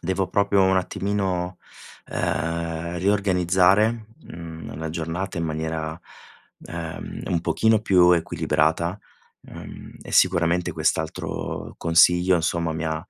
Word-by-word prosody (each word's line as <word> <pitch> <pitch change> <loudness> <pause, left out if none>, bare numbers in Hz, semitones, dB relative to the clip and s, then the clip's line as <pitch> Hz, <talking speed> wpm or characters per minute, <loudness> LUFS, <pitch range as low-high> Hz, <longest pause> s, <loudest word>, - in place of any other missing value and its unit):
Devo 95 +2 -1
proprio 100 -1 +2
un 95 0 +3
attimino, 95 -1 -2 0.5
uhm, 85 +1 -2
riorganizzare, 100 +3 +2 0.2
mhmm, 80 -3 -9
la 80 +1 -4
giornata 85 +3 -4
in 85 - -1
maniera, 80 0 -3 0.7
uhm, 85 -1 -6
un 85 - 0
pochino 110 +5 +2
più 90 -4 +5
equilibrata, 80 +2 0 0.4
uhm, - - -11
e - - -10
sicuramente 85 -1 +3
quest'altro - - -3
consiglio 90 +2 +4
insomma 85 -1 -1
mi 80 +1 -4
ha, 80 0 -1
85 Hz, 110 wpm, -23 LUFS, 80-95 Hz, 0.7 s, più